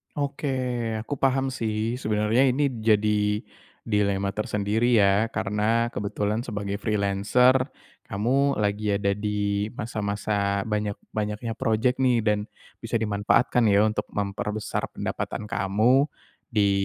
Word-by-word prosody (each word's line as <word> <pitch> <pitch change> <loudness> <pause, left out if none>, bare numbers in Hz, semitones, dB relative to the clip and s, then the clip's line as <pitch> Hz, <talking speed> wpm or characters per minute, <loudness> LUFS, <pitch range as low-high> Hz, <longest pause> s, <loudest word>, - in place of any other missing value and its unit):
Oke, 145 0 -2 0.5
aku 140 +4 -5
paham 135 0 +2
sih, 115 0 -2
sebenernya 110 +4 +2
ini 135 +2 +2
jadi 105 -1 +2 0.4
dilema 100 -2 +1
tersendiri 105 +3 +1
ya 100 +3 +4
karena 105 +4 +1
kebetulan 105 +2 -2
sebagai 100 -2 -3
freelancer, 110 +5 +2 0.4
kamu 135 +7 +1
lagi 105 0 0
ada 100 0 +1
di 105 0 -1
masa-masa 100 -2 -1
banyak-banyaknya 105 +1 -3
project 115 +4 +1
nih 125 -3 +3
dan, 105 -1 +2 0.4
bisa 115 0 -4
dimanfaatkan 110 +2 +2
ya 100 0 +5
untuk 110 0 0
memperbesar 105 +1 -2
pendapatan - - -3
kamu, 115 +7 +3 0.4
di 105 -5 +2
105 Hz, 110 wpm, -25 LUFS, 100-120 Hz, 0.5 s, ya